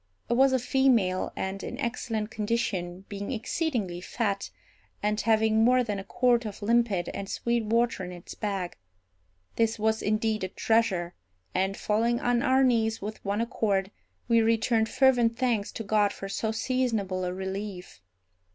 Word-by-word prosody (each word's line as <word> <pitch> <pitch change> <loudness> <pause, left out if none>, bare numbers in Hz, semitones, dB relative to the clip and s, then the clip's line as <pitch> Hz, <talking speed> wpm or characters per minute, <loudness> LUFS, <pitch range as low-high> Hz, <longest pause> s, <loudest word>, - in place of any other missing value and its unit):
It - - +5
was 265 +2 +5
a 260 - +3
female, 245 -7 +2
and 190 +1 -3
in 245 - -5
excellent 230 -4 -3
condition, 195 -5 -2
being 200 +2 -5
exceedingly 230 - -2
fat, 200 0 -2 0.5
and 210 +1 +1
having 220 0 +3
more 250 +2 +4
than 210 -4 -3
a - - -6
quart 245 +3 +2
of 210 -1 -7
limpid 220 -5 +2
and 200 0 -6
sweet 235 -1 -1
water 230 -2 +1
in 180 - -6
its 175 -1 -9
bag. 195 -4 -3 0.8
This 225 0 +2
was 220 +1 +1
indeed 215 0 0
a - - 0
treasure; 190 -4 +1 0.4
and, 190 +1 0
falling 230 +3 +1
on 245 -1 +1
our 260 +2 +3
knees 225 -3 +2
with 210 +2 -7
one 205 +2 -1
accord, 205 -4 0 0.4
we 230 -1 +4
returned 225 0 +2
fervent 245 -4 +3
thanks 235 -6 0
to 225 - -5
God 210 0 +2
for 195 - -7
so 220 +3 -2
seasonable 220 -6 -1
a 180 - -1
relief. 190 - -6
220 Hz, 160 wpm, -28 LUFS, 195-235 Hz, 0.8 s, It